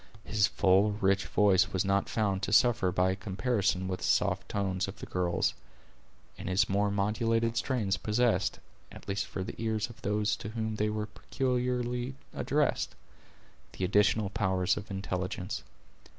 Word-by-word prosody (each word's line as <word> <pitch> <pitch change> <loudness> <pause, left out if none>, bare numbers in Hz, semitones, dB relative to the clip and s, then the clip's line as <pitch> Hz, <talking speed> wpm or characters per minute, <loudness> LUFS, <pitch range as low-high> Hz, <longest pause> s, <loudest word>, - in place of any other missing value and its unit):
His 105 -2 +2
full 100 +2 +3
rich 100 -1 +1
voice 95 -3 +4
was 95 +1 0
not 100 0 +1
found 100 -4 0
to 100 - -2
suffer 115 -3 +4
by 90 +1 +2
a - - -1
comparison 100 -1 -1
with 95 -1 -3
the - - -3
soft - - +1
tones 95 -2 -1
of - - -8
the - - -7
girls; 90 -1 0 0.9
and - - -5
his 95 +2 +3
more 100 +1 +1
modulated 115 +3 +1
strains 115 -6 0
possessed, 110 0 +1 0.3
at - - -12
least 100 +1 -2
for 95 - -4
the - - -6
ears 110 0 -1
of 120 +3 -17
those 105 0 +1
to 105 - -6
whom 110 -1 -3
they 105 0 +1
were 105 0 -2
peculiarly 125 +1 -2 0.2
addressed, - - 0 0.8
the 95 - -2
additional 100 +1 +2
power 95 -3 0
of 100 +3 0
intelligence. 95 -1 -3
105 Hz, 160 wpm, -30 LUFS, 95-110 Hz, 0.9 s, voice